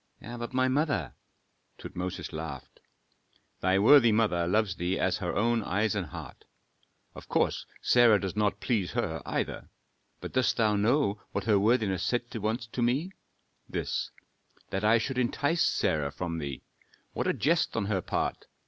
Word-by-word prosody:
"But 120 +1 -7
my 130 0 +2
mother?" 145 - 0 0.6
Tutmosis 90 0 -6
laughed. 80 -4 -7 0.8
"Thy 95 +1 +2
worthy 120 +3 +7
mother 105 -6 +2
loves 100 -1 +1
thee 90 +2 -1
as 90 -1 +1
her 90 -4 -3
own 115 +2 +2
eyes 100 +2 0
and 100 -5 -2
heart. - - -10 0.7
Of - - -12
course - - 0 0.2
Sarah 120 -4 +5
does 95 -1 -4
not 105 -1 +1
please 105 -8 -1
her, 80 -1 -2
either, - - -3 0.5
but - - -8
dost 110 -5 +2
thou 110 -2 +3
know 105 0 +1
what 100 - -1
her 105 -1 +3
worthiness 105 -4 +2
said 120 +5 -2
once 110 +2 -2
to 115 +2 -5
me? 135 +10 +1 0.6
This, - - -2 0.6
that 95 +2 -2
I 110 +2 +5
should 125 +3 -2
entice 145 +7 0
Sarah 75 - +1
from 85 0 -4
thee. 70 -4 -5 0.5
What - - -2
a - - +4
jest 165 -3 +1
on 105 - 0
her 100 -2 0
part! - - -2
105 Hz, 155 wpm, -29 LUFS, 95-120 Hz, 0.8 s, worthy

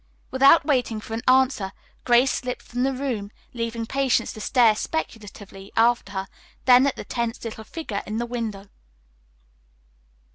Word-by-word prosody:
Without 275 +5 +6
waiting 250 -7 0
for 220 - -9
an 225 - -2
answer, 255 -7 +3 0.3
Grace 245 +2 +4
slipped 250 -1 -4
from 245 +1 -4
the 270 +1 +2
room, 250 -7 -3 0.2
leaving 230 -1 -3
Patience 265 -2 0
to 215 - -9
stare 235 -1 +4
speculatively 205 -8 -6
after 230 -3 +3
her, 190 0 -3 0.4
then 255 +1 +6
at 280 - -1
the - - -8
tense 235 -1 -3
little 220 -1 -6
figure 220 -6 -5
in 215 +1 -3
the 240 - -1
window. 220 -5 -5
235 Hz, 150 wpm, -24 LUFS, 215-255 Hz, 0.4 s, Without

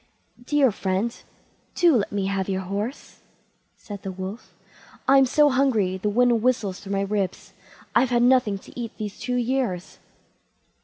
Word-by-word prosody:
"Dear 280 -1 +3
friend, 195 +4 -1 0.6
do 345 -5 +5
let 210 -4 0
me 200 -2 -1
have 195 0 -1
your 190 0 -1
horse", 200 +7 -5 0.6
said 205 -2 -9
the 195 - -5
Wolf; 190 +5 -8 0.5
"I'm 270 0 +6
so 295 +2 +4
hungry 225 -9 +2
the 210 +3 -1
wind 240 +1 +3
whistles 220 -6 0
through 200 0 -6
my 195 - +1
ribs; 200 -2 -3 0.4
I've 260 - +3
had 240 -1 +2
nothing 250 -5 +3
to 195 - -12
eat 230 -2 -6
these 210 -2 -6
two 250 - -2
years." 245 -7 -2
215 Hz, 155 wpm, -24 LUFS, 195-250 Hz, 0.6 s, I'm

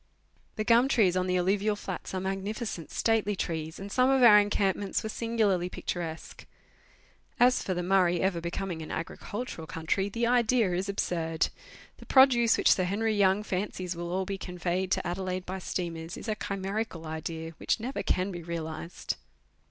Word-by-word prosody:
The 215 - -1
gum 235 +3 +5
trees 205 -9 +3
on 185 0 +1
the 180 0 +1
alluvial 200 +4 +1
flats 190 -2 -6
are - - 0
magnificent, 195 -1 -4
stately 220 -2 +1
trees, 160 -3 -3
and 200 +1 -8
some 255 +3 +3
of 270 -1 +4
our 210 -3 +9
encampments 205 -1 0
were 220 - -3
singularly 215 -6 0
picturesque. 170 -3 -5 0.9
As 250 +1 +4
tor 185 - -2
the 180 - -2
Murray 180 -2 +3
ever 185 -3 0
becoming 170 0 -4
an 155 - -7
agricultural 170 +1 -5
country, 165 +6 -1
the 230 +3 -1
idea 235 -4 +3
is 185 +3 -1
absurd. 165 -4 0 0.5
The - - -14
produce 250 -4 +6
which - - +4
Sir 185 - +3
Henry 215 +4 0
Young 200 0 +3
fancies 185 -2 -3
will 170 0 -5
all 190 +1 0
be 195 0 -4
conveyed 180 +1 -2
to - - -1
Adelaide 185 +1 -3
by 190 +1 -4
steamers 170 -2 -4
is - - -8
a 215 - +1
chimerical 195 -3 -4
idea 160 +1 -5
which - - 0
never 235 -1 -3
can 190 0 0
be 175 -2 -6
realized. 165 0 -5
190 Hz, 170 wpm, -29 LUFS, 175-215 Hz, 0.9 s, our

